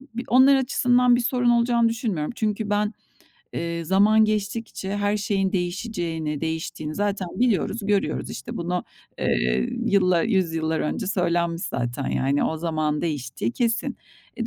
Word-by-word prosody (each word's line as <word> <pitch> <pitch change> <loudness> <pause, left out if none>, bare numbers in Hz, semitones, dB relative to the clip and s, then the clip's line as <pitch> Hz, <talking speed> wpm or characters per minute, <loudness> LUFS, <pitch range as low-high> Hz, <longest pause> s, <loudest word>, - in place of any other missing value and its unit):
b 240 - -2
onlar 265 +3 +6
açısından 250 -1 +3
bir 240 - +1
sorun 245 0 +1
olacağını 235 -1 +3
düşünmüyorum. 220 -9 -2
Çünkü 215 -1 -1
ben, 210 +1 +1 0.6
eee, 170 0 -3
zaman 210 +5 +4
geçtikçe 210 -1 -2
her 205 +1 +1
şeyin 195 -2 0
değişeceğini, 175 -5 -2
değiştiğini 160 -1 -4
zaten 200 -3 -1
biliyoruz, 230 -2 +1
görüyoruz. 205 -1 0
İşte 130 - -7
bunu, 175 +1 -2 0.3
eee, 60 +1 +1 0.2
yıllar 185 -4 +3
100 190 -7 +1
yıllar 160 0 -1
önce 190 +6 -2
söylenmiş 170 -3 0
zaten, 120 +3 -3
yani, 140 +2 +1
o 160 - -1
zamanın 155 -2 -1
değiştiği 130 -8 -3
kesin. 230 -1 -1 0.4
E, 230 - -2
195 Hz, 140 wpm, -24 LUFS, 160-225 Hz, 0.6 s, onlar